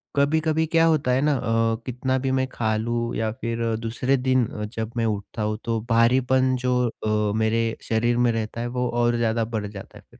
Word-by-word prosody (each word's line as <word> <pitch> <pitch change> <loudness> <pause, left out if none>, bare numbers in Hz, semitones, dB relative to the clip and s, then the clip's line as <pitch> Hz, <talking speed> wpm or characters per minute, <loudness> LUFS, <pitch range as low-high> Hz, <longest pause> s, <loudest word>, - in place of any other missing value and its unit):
कभी-कभी 155 +2 +2
क्या 165 +1 +3
होता 155 -6 +2
है 130 +2 +2
ना 150 0 +3
अ, 115 -2 +1
कितना 130 +1 -1
भी 135 0 -1
मैं 130 0 +1
खा 110 -2 -1
लूँ, 120 +1 -2
या 110 -1 -1
फिर 115 0 -2 0.2
दूसरे 120 +4 0
दिन 130 -1 +2
अ, 105 - -6
जब 110 +1 -5
मैं 115 - +1
उठता 105 +1 -3
हूँ 105 0 -1
तो 115 -1 0
भारीपन 130 +3 +3
जो 125 0 +2
अ, 105 -2 -1
मेरे 110 +1 +2 0.2
शरीर 120 +2 +1
में 120 -1 +3
रहता 115 +1 -3
है, 120 - -2
वो 125 0 -2
और 120 0 +1
ज़्यादा 115 -1 +1
बढ़ 105 -1 -2
जाता 100 -1 -10
है - - -16
फिर - - -20
120 Hz, 210 wpm, -24 LUFS, 110-130 Hz, 0.2 s, क्या